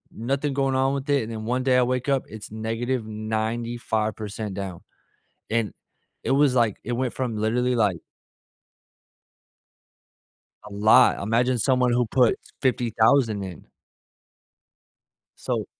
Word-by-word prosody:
Nothing 135 +5 -1
going 135 -1 0
on 135 +1 +2
with 140 +1 -4
it, 140 -4 +3
and 115 - -6
then 110 -1 -5
one 125 +3 -1
day 130 -1 +3
I 125 - +5
wake 125 +1 -1
up, 135 -2 +2
it's 110 -1 -9
-95% 110 -2 -3
down, 95 -3 -5 0.7
and 115 -2 0 0.5
it - - -1
was 140 -1 +3
like 115 -5 +2
it 120 - -3
went 125 0 -1
from 120 -4 -3
literally, 125 +4 +1
like 100 -8 +1 2.7
A - - -16
lot, 110 +5 +5
imagine 120 +4 +1
someone 125 +1 +2
who 120 0 +2
put 125 +1 +3 0.2
$50,000 115 -4 +2
in. - - -19 1.7
So - - -2
120 Hz, 125 wpm, -24 LUFS, 110-130 Hz, 2.7 s, I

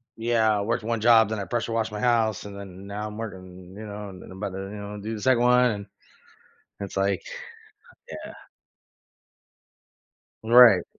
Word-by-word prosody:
Yeah. 115 -2 +2
I - - -1
worked 105 +1 -1
1 115 -1 -2
job, 110 -2 +6
then 110 -2 -2
I 100 - -3
pressure 120 -1 -2
washed 115 -1 -1
my 105 - -5
house, 115 -4 +1
and 100 -1 -8
then 95 -1 -10
now 105 +1 -4
I'm 105 0 -8
working, 95 -4 -9
you 110 +2 -8
know, 105 -1 -7
and 95 -1 -11
then - - -12
I'm 95 - -10
about 100 -1 -4
to, 95 - -5
you 95 - -7
know, 105 0 -7
do 110 +2 -4
the 105 - -7
2nd 130 -1 +3
one. 125 -5 +3 0.9
It's, 100 -1 -6
like, 100 0 +1 0.9
yeah. - - -8 2.1
Right. 115 -5 +7
105 Hz, 180 wpm, -25 LUFS, 100-115 Hz, 2.1 s, Right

